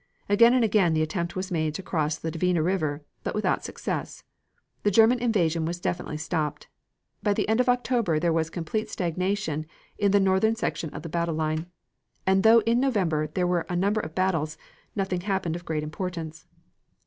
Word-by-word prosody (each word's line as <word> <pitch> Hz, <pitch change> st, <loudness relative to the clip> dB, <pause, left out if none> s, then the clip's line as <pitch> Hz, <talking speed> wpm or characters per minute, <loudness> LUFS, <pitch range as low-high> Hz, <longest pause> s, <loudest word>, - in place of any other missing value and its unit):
Again 230 Hz, +4 st, +6 dB
and 250 Hz, -, +4 dB
again 195 Hz, -6 st, +3 dB
the 155 Hz, -, +2 dB
attempt 170 Hz, +2 st, -3 dB
was 185 Hz, +1 st, -4 dB
made 155 Hz, -3 st, 0 dB
to 190 Hz, -, -5 dB
cross 155 Hz, -3 st, -1 dB
the 160 Hz, +1 st, -4 dB
Dvina 170 Hz, 0 st, +1 dB
River, 155 Hz, -5 st, -1 dB, 0.2 s
but -, -, -3 dB
without 210 Hz, -, 0 dB
success; -, -, -4 dB, 0.6 s
the 205 Hz, -, +2 dB
German 225 Hz, +4 st, +5 dB
invasion 175 Hz, -9 st, +1 dB
was 170 Hz, +2 st, -3 dB
definitely 170 Hz, -3 st, -3 dB
stopped. 155 Hz, -1 st, -3 dB, 0.5 s
By 205 Hz, -1 st, +1 dB
the -, -, 0 dB
end 220 Hz, +2 st, +2 dB
of 250 Hz, 0 st, +3 dB
October 245 Hz, -8 st, +1 dB
there 170 Hz, 0 st, +1 dB
was 160 Hz, -1 st, 0 dB
complete 200 Hz, +7 st, -3 dB
stagnation 180 Hz, -3 st, -2 dB, 0.3 s
in 205 Hz, -, +3 dB
the 205 Hz, -, +5 dB
northern 195 Hz, +3 st, +3 dB
sector 170 Hz, -7 st, -2 dB
of 150 Hz, -, -8 dB
the 165 Hz, -, -6 dB
battle 170 Hz, 0 st, -1 dB
line, 155 Hz, +1 st, -1 dB, 0.6 s
and 190 Hz, 0 st, +4 dB
though 225 Hz, +2 st, +7 dB
in 230 Hz, +3 st, +2 dB
November 185 Hz, -, +1 dB
there 180 Hz, +4 st, -1 dB
were 175 Hz, -1 st, 0 dB
a 180 Hz, -, -1 dB
number 200 Hz, +4 st, +1 dB
of 155 Hz, 0 st, -8 dB
battles, 165 Hz, -5 st, 0 dB, 0.4 s
nothing 190 Hz, -3 st, -1 dB
happened 190 Hz, -4 st, -1 dB
of 175 Hz, 0 st, -7 dB
great 155 Hz, -1 st, -2 dB
importance. 160 Hz, 0 st, -5 dB
180 Hz, 185 wpm, -26 LUFS, 160-205 Hz, 0.6 s, though